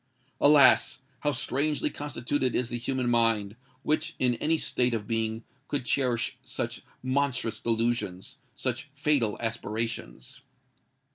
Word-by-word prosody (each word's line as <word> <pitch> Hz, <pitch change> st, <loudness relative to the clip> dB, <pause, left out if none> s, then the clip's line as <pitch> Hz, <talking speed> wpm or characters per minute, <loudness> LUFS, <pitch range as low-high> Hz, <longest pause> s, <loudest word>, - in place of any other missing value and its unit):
Alas! 145 Hz, -2 st, +6 dB, 0.2 s
how 145 Hz, +3 st, +1 dB
strangely 145 Hz, +2 st, 0 dB
constituted 130 Hz, -2 st, -2 dB
is 120 Hz, -1 st, 0 dB
the 120 Hz, -, -3 dB
human 130 Hz, +1 st, -1 dB
mind, 115 Hz, -3 st, +2 dB, 0.3 s
which, 155 Hz, +1 st, 0 dB
in 125 Hz, -1 st, +3 dB
any 160 Hz, +6 st, +1 dB
state 125 Hz, -5 st, 0 dB
of 105 Hz, -2 st, -4 dB
being, 115 Hz, 0 st, -1 dB, 0.2 s
could 145 Hz, -4 st, -2 dB
cherish 125 Hz, -3 st, 0 dB
such -, -, -4 dB, 0.2 s
monstrous 130 Hz, -3 st, 0 dB
delusions—such 120 Hz, +3 st, -2 dB
fatal 140 Hz, -7 st, +1 dB
aspirations! 115 Hz, -, -4 dB
120 Hz, 115 wpm, -28 LUFS, 115-140 Hz, 0.3 s, Alas